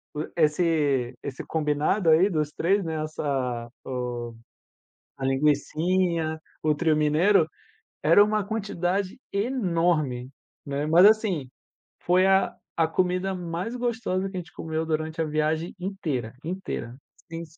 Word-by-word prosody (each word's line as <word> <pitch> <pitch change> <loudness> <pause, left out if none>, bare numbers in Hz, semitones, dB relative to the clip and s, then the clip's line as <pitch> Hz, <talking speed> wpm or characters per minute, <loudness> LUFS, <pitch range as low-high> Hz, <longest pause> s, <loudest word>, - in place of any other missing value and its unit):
o 150 - -3
esse 150 -5 +2
esse 135 -2 -6
combinado 155 +4 +1
aí 175 +6 +5
dos 155 -4 0
3, 195 +4 +1
né, 160 -2 -2
essa 130 -6 -2 0.2
o 125 -2 -4 0.8
a 135 - -3
linguicinha, 160 +4 +1 0.2
o 155 -1 +3
trio 160 0 +2
mineiro, 160 +4 +4 0.6
era 165 +7 +7
uma 210 0 +1
quantidade 200 -2 -2
enorme, 170 - 0 0.4
né. 140 +1 -2
Mas 170 +4 +7
assim, 205 - +3 0.5
foi 180 +1 +3
a 195 0 +3 0.2
a 165 -1 +3
comida 185 +3 0
mais 180 +6 -4
gostosa 225 -6 -1
que 190 - -6
a - - -1
gente 175 0 -10
comeu 160 0 -3
durante 160 +1 -2
a - - +1
viagem 155 +2 -1
inteira, 155 - -3
inteira, 165 -8 -5 0.3
sem 165 0 -5
165 Hz, 130 wpm, -26 LUFS, 150-185 Hz, 0.8 s, era